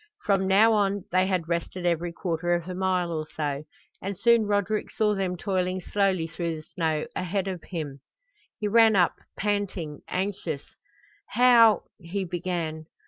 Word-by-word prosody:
From 195 -2 +2
now 210 +4 +5
on 200 -2 +1
they 185 +1 +3
had 180 -4 -1
rested 170 +1 -3
every 170 0 0
quarter 175 0 -1
of 170 0 -4
a 185 - -4
mile 185 -2 0
or 155 -1 -3
so, 145 -1 -2 0.4
and 195 0 -4
soon 235 +1 +4
Roderick 205 +1 0
saw 210 -1 +1
them 190 -2 -2
toiling 185 -1 -1
slowly 190 -2 +1
through 165 0 -3
the 155 - -9
snow 160 -3 0
ahead 190 +2 -1
of 185 -3 -4
him. 150 -6 -5 0.6
He 210 - -2
ran 220 0 +5
up, 180 -3 +4 0.2
panting, 195 -7 -2
anxious. 180 -6 -3 0.6
"How 235 -4 +6
" - - -59
he 190 +2 -3
began. 170 -3 -3
185 Hz, 160 wpm, -26 LUFS, 170-200 Hz, 0.6 s, How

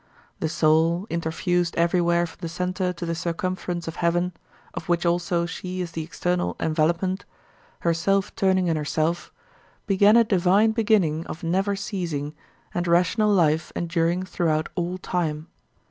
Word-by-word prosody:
The 160 - -1
soul, 160 +3 +2
interfused 170 +1 0
everywhere 170 0 +2
from 165 - -12
the 165 - -4
centre 180 +2 -1
to 175 -1 -6
the 165 - -1
circumference 175 +1 -3
of 165 - -5
heaven, 175 +1 +1 0.4
of 165 - -7
which 175 0 +1
also 170 0 +1
she 185 +1 -5
is 175 -2 -3
the 165 - -4
external 175 +2 -1
envelopment, 170 +4 0 0.6
herself 180 +4 +1
turning 190 -3 +2
in 165 -2 +1
herself, 155 +3 -1 0.5
began 205 +2 +5
a 235 - +7
divine 200 +1 +3
beginning 205 -8 +2
of 160 - -7
never 190 +4 +1
ceasing 170 -8 -3 0.4
and 175 0 -1
rational 180 +5 +3
life 160 -4 +2
enduring 170 +1 0
throughout 160 -4 -1
all 180 0 -2
time. 165 -3 -2
175 Hz, 145 wpm, -24 LUFS, 165-185 Hz, 0.6 s, a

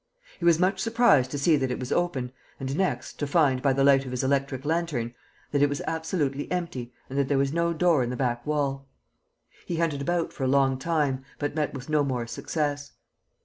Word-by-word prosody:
He 170 - -3
was 170 -2 +6
much 190 +2 +1
surprised 230 - +4
to 145 - -4
see 150 +2 +4
that 130 -2 -1
it - - -3
was 125 - -5
open 140 -8 0 0.3
and, 135 +1 -3
next, 190 +2 -2
to 145 - -1
find, 140 -4 +3
by 140 - +3
the 135 +1 +2
light 135 -1 +5
of 130 - -7
his 125 0 -2
electric 135 0 0
lantern, 155 -8 -1 0.4
that 145 - +1
it 145 - +5
was 145 - -2
absolutely 160 -4 -2
empty 165 -9 -3 0.2
and 135 +1 -3
that 140 - +2
there 140 - +1
was 135 +1 +1
no 170 0 +1
door 170 -3 +3
in 120 - -1
the 125 - -4
back 120 -2 -1
wall. 140 -2 -1 0.8
He 175 - -2
hunted 160 -4 0
about 170 +3 -1
for 135 - -5
a - - +2
long 135 -1 +3
time, 145 -4 0
but 145 0 -2
met 150 -2 -1
with 130 -1 -7
no 155 -1 +2
more 125 -4 -2
success. 145 +2 -3
140 Hz, 220 wpm, -26 LUFS, 130-160 Hz, 0.8 s, was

